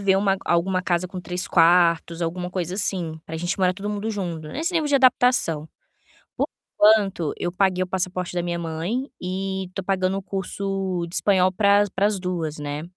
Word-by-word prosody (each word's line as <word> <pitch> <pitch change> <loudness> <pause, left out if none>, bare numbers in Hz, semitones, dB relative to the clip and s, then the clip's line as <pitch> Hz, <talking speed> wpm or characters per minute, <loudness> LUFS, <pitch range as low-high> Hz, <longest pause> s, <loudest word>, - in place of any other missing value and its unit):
ver 195 -1 +3
uma 195 0 +2
alguma 185 +2 +1
casa 175 0 0
com 185 0 -6
3 180 +1 -4
quartos, 170 0 +3
alguma 180 +2 -3
coisa 180 -1 -3
assim, 180 -5 -2
para 160 - -8
a - - -3
gente 175 +4 -2
morar 185 -1 +2
todo 200 +2 -5
mundo 210 +1 -3
junto, 170 -7 -4
nesse 325 - -3
nível 320 -3 +1
de 290 - +2
adaptação. 245 - +3 0.7
Por - - 0 0.4
enquanto, 195 -7 +3
eu 175 - -2
paguei 185 0 +1
o - - -6
passaporte 185 -1 -2
da 175 - 0
minha 175 0 -2
mãe 170 - -3
e 190 0 -3
tô 195 - -4
pagando 185 0 0
o - - -3
curso 195 -2 -3
de 170 - -7
espanhol 185 -2 +3
para 200 +2 +4
as 205 - 0
para 195 +2 0
as 210 -2 -1
2, 175 -4 -3
né? 145 0 -4
185 Hz, 200 wpm, -23 LUFS, 175-195 Hz, 0.7 s, para